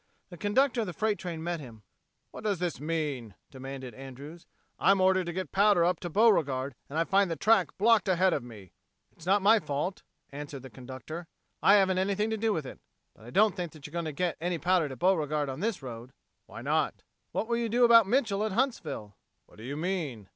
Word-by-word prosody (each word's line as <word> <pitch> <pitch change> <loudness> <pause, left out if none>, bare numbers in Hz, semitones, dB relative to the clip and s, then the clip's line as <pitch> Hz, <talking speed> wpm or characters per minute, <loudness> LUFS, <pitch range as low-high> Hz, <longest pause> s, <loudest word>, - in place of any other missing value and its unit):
The 175 - -9
conductor 235 +6 +2
of 215 - -3
the 180 - -5
freight 215 +3 0
train 170 -3 -5
met 170 0 -2
him. 115 -7 -12 0.5
"What - - -10
does 205 -3 0
this 175 -1 -3
mean?" 145 - -3 0.2
demanded 130 -2 -8
Andrews. 135 +6 -10 0.3
"I'm 195 0 +4
ordered 185 -1 +3
to - - -2
get 185 +2 -4
powder 200 -3 +4
up 180 -1 +1
to 175 - -5
Beauregard, 150 - +2 0.2
and 145 - -5
I 165 - +3
find 195 +2 +2
the 165 - -1
track 210 -2 +2
blocked 220 0 +4
ahead 185 0 +3
of - - -1
me." 110 -7 -12 0.4
"It's 165 - -15
not 195 +1 +3
my 220 +3 +6
fault," 150 +3 -3 0.3
answered 140 -1 -7
the 130 - -10
conductor. 130 +7 -8 0.3
"I 200 - +6
haven't 190 -2 +3
anything 200 +3 0
to 220 - -1
do 220 +1 +1
with 160 -8 -2
it. - - -9 0.3
But 110 - -18
I - - -9
don't 205 - +3
think 175 -4 -4
that 155 -3 -13
you're 150 - -8
going 170 0 -3
to 155 - -3
get 175 +2 -2
any 175 0 -1
powder 175 -2 +2
to 130 - -7
Beauregard 150 -3 +1
on 135 +1 -5
this 210 -7 -2
road." 120 0 -8 0.3
"Why - - -9
not?" - - 0 0.3
"What 220 - -2
will 235 0 0
you 235 -1 -1
do 240 +3 +3
about 230 -3 +7
Mitchel 220 -4 +1
at 215 -2 -2
Huntsville?" 160 - -2 0.3
"What - - -20
do - - -10
you 140 +4 -5
mean?" 155 - -3
175 Hz, 220 wpm, -29 LUFS, 140-200 Hz, 0.5 s, about